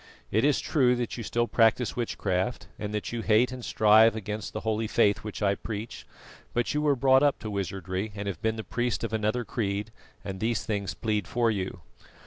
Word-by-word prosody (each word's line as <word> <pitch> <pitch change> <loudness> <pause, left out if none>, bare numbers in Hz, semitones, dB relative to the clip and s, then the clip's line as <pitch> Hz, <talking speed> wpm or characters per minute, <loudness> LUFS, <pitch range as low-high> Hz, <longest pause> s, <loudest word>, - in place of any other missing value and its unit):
It 110 +3 +2
is 145 -1 +3
true 125 -5 +2
that 120 -1 -3
you 115 - -5
still 120 +2 0
practise 115 +1 +3
witchcraft, 110 -2 -1
and 105 -1 -4
that 105 -1 -3
you 120 -1 -3
hate 115 +3 +3
and 130 -1 -7
strive 110 +1 +5
against 105 -1 -5
the 110 - -5
holy 110 0 -1
Faith 105 -2 +3
which 105 0 -6
I 100 -1 +3
preach; 110 +2 -6 0.5
but 120 0 +1
you 150 - 0
were 145 -2 +3
brought 130 +1 +5
up 145 -1 +3
to 110 - -5
wizardry 95 +1 -3
and 100 0 -5
have 95 -5 -4
been 110 0 0
the 110 - -5
priest 120 0 -2
of 115 - -3
another 110 +3 0
creed, 105 -1 -2 0.3
and 95 -1 -5
these 110 0 -1
things 100 -3 -2
plead 105 -3 -1
for 120 -1 +1
you. 95 -3 -4
110 Hz, 205 wpm, -27 LUFS, 105-120 Hz, 0.5 s, strive